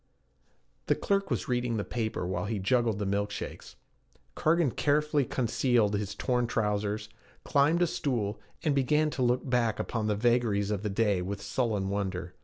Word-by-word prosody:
The - - +3
clerk 195 -1 0
was - - -1
reading 120 -2 0
the 100 - -1
paper 110 -5 -3
while 90 0 -2
he 110 +1 -2
juggled 115 +2 +1
the 105 - -2
milk 100 +1 0
shakes. 105 - -7 0.6
Cargan, 160 -3 +2
carefully 150 0 +1
concealing 120 -4 +1
his 100 -1 -4
torn 125 -2 0
trousers, 105 -1 -1 0.4
climbed 155 +5 +3
a - - +5
stool, 115 -11 -2 0.2
and 150 - +2
began 150 +3 +2
to 130 - -4
look 125 +1 +1
back 120 -3 +1
upon 110 -2 -2
the 105 - +1
vagaries 110 -3 +2
of 100 -2 -1
the 105 - -2
day 100 -2 +1
with 100 +3 -4
sullen 105 -2 -1
wonder. 95 -3 -3
115 Hz, 170 wpm, -29 LUFS, 100-130 Hz, 0.6 s, a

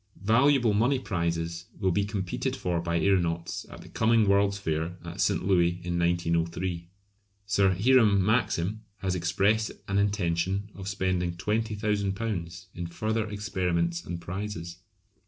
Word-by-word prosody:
Valuable 120 +1 +4
money 120 +7 +3
prizes 85 -6 -2
will 95 -2 +2
be 100 +3 +1
competed 100 -3 -2
for 85 -2 -1
by 85 0 0
aeronauts 85 -3 0
at - - -10
the - - -13
coming 110 -1 +3
World's 100 0 +3
Fair 80 -1 -2
at 85 +3 -5
St. 100 -2 +1
Louis 90 -2 +3
in 85 0 -1
1903. 85 0 0 0.6
Sir 100 -1 +3
Hiram 105 -5 +5
Maxim 110 -2 +1 0.2
has 95 -2 0
expressed 95 +5 +1 0.2
an 100 +1 +1
intention 100 0 0
of 95 -1 -8
spending 95 -3 -1
£20,000 105 -2 -2
in 85 -1 -5
further 110 +5 -2
experiments 90 -5 -1
and 85 -1 -5
prizes. 90 -2 -5
95 Hz, 135 wpm, -28 LUFS, 85-105 Hz, 0.6 s, Hiram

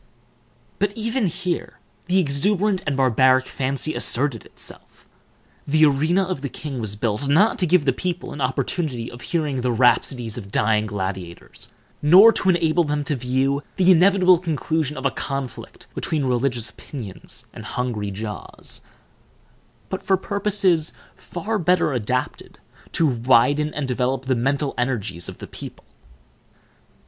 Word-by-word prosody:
But 205 0 +1
even 225 0 0
here 175 +1 -3 0.3
the 180 +1 +2
exuberant 190 +5 +1
and 140 -2 0
barbaric 130 0 +4
fancy 135 +4 -2
asserted 130 -5 +1
itself. - - -10 0.6
The 155 +2 +5
arena 155 +7 +2
of 185 -7 -3
the 140 - -3
king 140 -3 -6
was 105 -2 -1
built, 110 +4 -1
not 200 - +3
to 180 - +3
give 170 -3 +3
the 135 - +3
people 180 +5 -4
an 145 - -7
opportunity 130 -1 -2
of 120 - -11
hearing 150 -6 -1
the 125 0 0
rhapsodies 120 -1 +1
of 100 -4 -10
dying 105 +1 +1
gladiators, 95 -4 -6 0.3
nor 190 +10 +8
to 190 - +1
enable 170 -1 +3
them 145 -1 -1
to 145 - -1
view 130 +3 0
the 185 -1 +5
inevitable 185 0 +5
conclusion 160 -3 -2
of 130 - -5
a - - +3
conflict 135 -2 -6
between 150 -4 -1
religious 125 -2 0
opinions 110 -10 -9
and - - -9
hungry 115 -5 -3
jaws, 105 +1 -7 1.1
but 190 - -3
for 190 - +2
purposes 195 -5 0 0.2
far 210 +5 -4
better 175 -3 +2
adapted 125 +2 -3 0.4
to 165 - +2
widen 130 +3 +3
and 145 -2 -2
develop 130 +1 -1
the 130 - +1
mental 135 +3 0
energies 110 -8 -2
of - - -10
the - - -8
people. - - -10
140 Hz, 145 wpm, -22 LUFS, 125-175 Hz, 1.1 s, nor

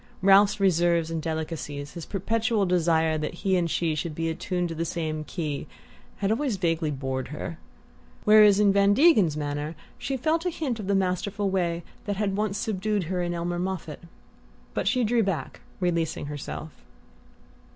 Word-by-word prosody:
Ralph's 200 +2 +6
reserves 170 -3 +2
and 165 -1 -2
delicacies, 155 -3 -4
his 170 - -7
perpetual 220 +2 0
desire 160 -3 +2
that 150 +2 -3
he 190 -1 +3
and 175 -2 +1
she 165 0 0
should 155 +1 -3
be 165 0 -1
attuned 175 +1 -2
to - - -4
the 165 +1 -2
same 155 -2 -3
key, 155 -3 -4 0.5
had 200 +1 0
always 240 -2 0
vaguely 165 -3 0
bored 130 -2 -3
her; 155 +3 -6 0.6
whereas 210 -1 +7
in 205 -2 +5
Van 200 0 +4
Degen's 210 - +5
manner 145 +2 -3 0.2
she 270 - -2
felt 315 +5 +1
a 360 - +1
hint 280 -9 -3
of 200 - -5
the 200 - +2
masterful 195 +1 0
way 175 -2 0 0.2
that 205 - -1
had 195 -1 -1
once 210 -1 -1
subdued 210 -1 -1
her 180 +2 -2
in 175 0 -2
Elmer 175 +1 -2
Moffatt. 180 -4 -4 0.7
But - - -1
she 255 -1 +2
drew 230 +1 +2
back, 195 -6 -3 0.2
releasing 170 -5 -1
herself. 150 +2 -6
180 Hz, 170 wpm, -26 LUFS, 160-205 Hz, 0.7 s, whereas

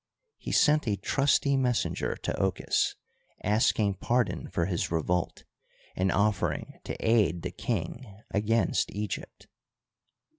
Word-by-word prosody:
He - - -5
sent 150 -3 +4
a 105 - +2
trusty 140 +6 +2
messenger 125 -3 0
to - - -3
Ochus, - - +1 0.5
asking 105 -2 +2
pardon 120 0 0
for 85 - 0
his 90 -2 -1
revolt, 85 +1 -1 0.5
and 95 0 +1
offering 100 +1 0
to - - -4
aid 100 -7 +3
the - - -3
king 115 +3 -3 0.2
against 105 -2 +1
Egypt. 105 -2 -5
105 Hz, 115 wpm, -28 LUFS, 90-120 Hz, 0.5 s, sent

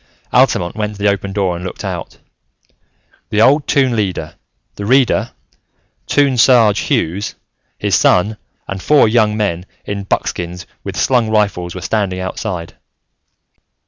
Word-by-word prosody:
Altamont 85 +2 +2
went 105 -1 -3
to 100 - -8
the - - +4
open 100 0 -2
door 95 -3 0
and 85 - -7
looked 95 - -6
out. - - -5 1.1
The 105 - 0
old 140 +6 +4
Toon 130 -4 +2
Leader, 95 -7 -2 0.4
the 100 - -6
Reader, 130 +1 +3 0.8
Toon 140 -3 +2
Sarge 115 -4 +5
Hughes, 95 +6 -1 0.4
his - - -2
son 105 +4 +3 0.3
and 95 -1 -5
four 150 0 +4
young 110 -1 +2
men 90 -5 -1 0.2
in 100 -1 -4
buckskins 90 -2 -3 0.2
with - - -6
slung 120 -4 +2
rifles 100 -5 0
were 95 - -6
standing 95 -1 -1
outside. 95 -2 -4
105 Hz, 140 wpm, -16 LUFS, 90-110 Hz, 1.1 s, Sarge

